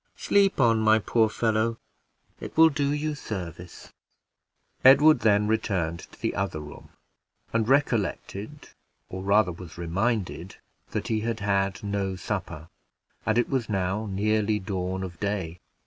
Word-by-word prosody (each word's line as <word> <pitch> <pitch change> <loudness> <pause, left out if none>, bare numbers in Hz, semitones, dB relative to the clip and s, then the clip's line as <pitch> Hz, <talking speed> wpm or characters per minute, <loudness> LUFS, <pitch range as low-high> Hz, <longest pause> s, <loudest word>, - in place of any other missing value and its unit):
Sleep 200 -3 +2
on, 115 -3 +4
my 110 0 +5
poor 110 +1 +2
fellow! 110 +1 0 0.6
it - - -9
will 160 0 +8
do 140 -1 -1
you 150 +1 -1
service." 90 - -8 0.9
Edward 145 +4 +7
then 105 -1 +3
returned 95 -7 -1
to - - -14
the - - -1
other 75 - -2
room, 75 0 -11 0.6
and 115 0 +1
recollected, 125 -1 -1 0.4
or, 95 - -6
rather, 100 -1 +3
was 85 -1 -11
reminded, 95 +1 -2 0.3
that - - -4
he 110 - +1
had 115 0 -3
had 100 -1 0
no 100 -2 -2
supper, 80 -3 -5 0.6
and 110 +1 +2
it 120 - +2
was 130 -4 -2
now 95 +2 -1
nearly 105 +2 +1
dawn 95 -1 -3
of 90 -3 -7
day. 95 -5 -3
105 Hz, 140 wpm, -26 LUFS, 95-115 Hz, 0.9 s, will